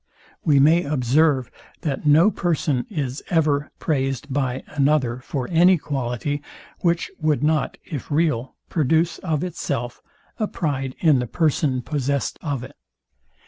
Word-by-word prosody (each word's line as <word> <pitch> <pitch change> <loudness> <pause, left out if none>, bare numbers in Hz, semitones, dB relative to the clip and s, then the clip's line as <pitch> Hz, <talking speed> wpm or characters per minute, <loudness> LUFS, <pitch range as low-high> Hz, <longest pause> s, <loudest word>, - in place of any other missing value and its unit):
We 145 -3 +4
may 160 +5 +5
observe, 135 -1 +2 0.3
that 150 -2 -2
no 160 +8 +6
person 160 -8 0
is 140 -8 -3
ever 150 -3 +2
praised 135 -2 -1
by 130 -2 -1
another 140 -4 +1
for 130 0 -4
any 175 +2 +6
quality, 140 0 -3 0.4
which 170 -1 0
would 155 -2 +1
not, 155 -1 +1
if 150 -7 -6
real, 145 -5 0
produce, 160 +2 +1
of 160 -4 -1
itself, 140 -8 -3 0.4
a 215 - +1
pride 135 -8 -2
in 155 -6 +5
the 125 - -2
person 140 -2 +1
possest 140 -1 -2
of 140 -6 -3
it. - - -11
145 Hz, 135 wpm, -23 LUFS, 130-160 Hz, 0.4 s, no